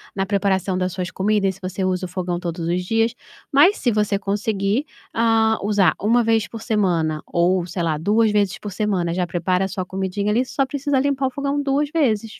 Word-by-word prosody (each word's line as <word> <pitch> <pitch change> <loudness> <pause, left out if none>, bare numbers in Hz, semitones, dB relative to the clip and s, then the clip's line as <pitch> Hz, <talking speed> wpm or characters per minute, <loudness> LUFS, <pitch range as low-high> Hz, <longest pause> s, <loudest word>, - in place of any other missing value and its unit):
na 195 - 0
preparação 195 -2 0
das 185 0 -1
suas 185 -1 -3
comidas, 195 -1 0
se 195 - -19
você 185 +1 -4
usa 185 0 0
o 175 - -7
fogão 180 -1 -3
todos 170 -1 -4
os 180 +1 -1
dias, 225 +4 +1 0.4
mas 310 +9 +5
se 245 - +1
você 210 -2 +1
conseguir, 205 +4 -1 0.3
hã, 225 -1 +3
usar 200 -5 +3
1 235 +3 +3
vez 225 0 +2
por 225 - -9
semana, 170 -9 0
ou 175 +1 +1
sei 175 0 -4
lá 160 -2 0
2 210 +7 +2
vezes 200 -3 +1
por 205 - -6
semana, 190 -4 -1
já 180 0 0
prepara 180 +2 0
a - - -2
sua 190 -1 -4
comidinha 190 +2 -2
ali 245 +4 +2
só 270 +1 -1
precisa 285 0 0
limpar 275 0 +1
o 260 - -4
fogão 280 +1 -2
2 280 +1 0
vezes. 225 -9 0
200 Hz, 210 wpm, -21 LUFS, 185-225 Hz, 0.4 s, mas